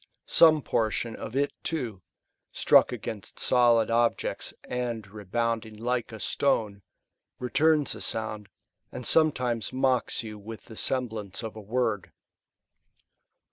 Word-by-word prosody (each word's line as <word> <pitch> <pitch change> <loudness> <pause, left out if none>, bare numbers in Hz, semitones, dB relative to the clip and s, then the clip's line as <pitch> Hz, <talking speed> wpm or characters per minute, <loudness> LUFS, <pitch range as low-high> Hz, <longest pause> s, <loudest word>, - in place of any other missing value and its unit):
Some 155 -3 +6
portion 115 +1 -1
of 110 - -7
it 140 +1 +1
/^o, 120 - -3 0.5
struck - - +5
against 105 -3 -6
solid 120 -2 +4
objects, 115 0 0
and 120 -3 -3
rebounding 110 +3 -3
like 120 +2 -2
a 110 - -8
stone,^ 105 -6 0 0.6
returns 150 +3 +2
a - - -9
sound, 110 -2 -2 0.4
and 125 -1 -7
sometimes 125 -8 +2
mocks 130 -2 0
you 105 -2 -8
with 110 +2 -9
the 110 - -11
semblance 110 -5 -2
of 110 -1 -6
a 110 - -8
word. 110 -2 -1
115 Hz, 120 wpm, -27 LUFS, 110-125 Hz, 0.6 s, Some